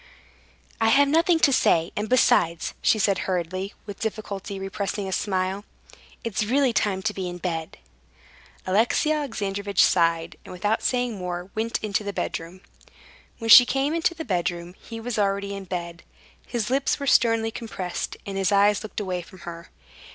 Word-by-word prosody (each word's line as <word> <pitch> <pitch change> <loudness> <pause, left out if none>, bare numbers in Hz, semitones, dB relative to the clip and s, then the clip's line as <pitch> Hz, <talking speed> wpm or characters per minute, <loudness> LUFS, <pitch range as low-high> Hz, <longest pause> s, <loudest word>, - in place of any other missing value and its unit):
"I 225 - +4
have 280 +5 +5
nothing 330 +3 +3
to 275 - +5
say. 165 -7 +3
And 210 +1 -3
besides," 170 -9 +3
she - - +3
said 200 -2 +2
hurriedly, 185 +2 -3
with 205 -2 -8
difficulty 205 -2 -4
repressing 195 +1 -3
a - - -4
smile, 190 0 -1 0.6
"it's 220 -2 -1
really 255 +3 +2
time 200 -3 0
to 215 - 0
be 185 -2 -4
in 175 - -6
bed." 165 -3 -4 0.9
Alexey 225 +10 +2
Alexandrovitch 200 -9 0
sighed, 165 -1 +2
and, - - -11
without 205 +5 -1
saying 245 -4 -1
more, 180 +1 -5
went 225 +1 -1
into 210 0 -1
the 200 0 -4
bedroom. 175 +1 -4 0.8
When 225 -1 0
she 250 - +12
came 270 +4 0
into 335 +1 +1
the 320 -1 -6
bedroom, 175 -3 -2
he 225 -1 -8
was 230 -1 -3
already 200 0 0
in 195 -1 -7
bed. 170 -2 -5 0.5
His 235 -1 -2
lips 275 +2 +1
were 280 - -3
sternly 225 -4 +3
compressed, 195 -6 -5
and 195 -1 -4
his 195 +1 +1
eyes 205 +1 +4
looked 215 - -6
away 185 -3 -3
from 185 +1 -15
her. 170 -1 -9
200 Hz, 165 wpm, -24 LUFS, 185-225 Hz, 0.9 s, she